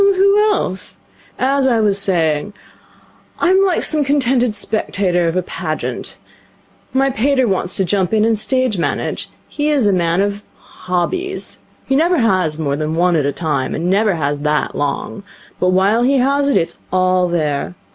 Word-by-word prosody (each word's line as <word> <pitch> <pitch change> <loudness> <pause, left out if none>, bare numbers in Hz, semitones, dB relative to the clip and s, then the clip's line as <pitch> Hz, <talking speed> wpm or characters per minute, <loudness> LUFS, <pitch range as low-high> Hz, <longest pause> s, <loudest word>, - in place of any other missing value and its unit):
'Who 395 +1 +4
else? 190 - -3 0.4
As 270 +1 +1
I 235 -3 +2
was 205 -2 +1
saying, 170 -1 0 0.8
I 350 - +2
am 380 +1 +4
like 375 -3 +1
some 305 -2 +2
contented 255 -5 +1
spectator 195 -4 0
of 165 - -1
a 185 - 0
Pageant. - - -5 0.7
My 270 +1 +1
pater 260 +1 +1
wants 190 -2 -1
to 190 - +1
jump 185 0 0
in 220 -1 +2
and 225 0 +2
stage 250 -1 +1
manage. - - -2 0.2
He 295 0 -2
is 285 -6 +2
a 200 - +3
man 170 -1 +1
of 205 +1 -2
hobbies. 355 - -4 0.3
He 270 - 0
never 340 +5 +2
has 185 - +1
more 145 -3 -1
than 155 +1 -3
one 175 +1 +2
at 145 -3 +1
a - - 0
time, 145 -4 -2
and 160 - -4
he 175 - 0
never 205 -1 +2
has 145 -2 -2
that 150 0 -1
long. 145 +7 -3 0.4
But 180 - +2
while 195 +5 +2
he 270 +3 +3
has 280 +2 +2
it, 280 - +3
it's 165 - -2
all 185 0 +2
there. 155 -2 -2
200 Hz, 175 wpm, -17 LUFS, 175-265 Hz, 0.8 s, Who